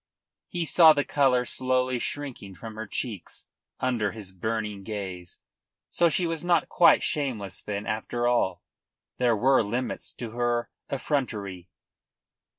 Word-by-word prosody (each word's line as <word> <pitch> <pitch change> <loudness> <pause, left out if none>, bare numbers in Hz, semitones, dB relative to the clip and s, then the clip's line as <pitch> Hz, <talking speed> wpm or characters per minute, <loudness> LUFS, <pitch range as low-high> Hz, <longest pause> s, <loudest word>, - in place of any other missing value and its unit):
He 175 -2 -2
saw 160 +1 +7
the 145 -1 +1
colour 130 -3 +3
slowly 130 0 0
shrinking 125 -9 -5
from 110 +2 -8
her 110 0 -6
cheeks 105 -5 -5 0.3
under 115 -6 0
his 105 -4 -8
burning 105 +1 -3
gaze. 95 -4 -6 0.5
So 170 - +3
she 175 +3 +2
was 165 -1 -2
not 175 -1 +2
quite 170 - +5
shameless 120 - -2
then, 100 0 -4
after 110 +3 -2
all. 95 -8 +1 0.6
There 120 -2 +3
were 130 +5 +4
limits 120 +4 -3
to 115 -3 -6
her 120 0 -1 0.2
effrontery. 105 - -2
120 Hz, 135 wpm, -27 LUFS, 105-135 Hz, 0.6 s, saw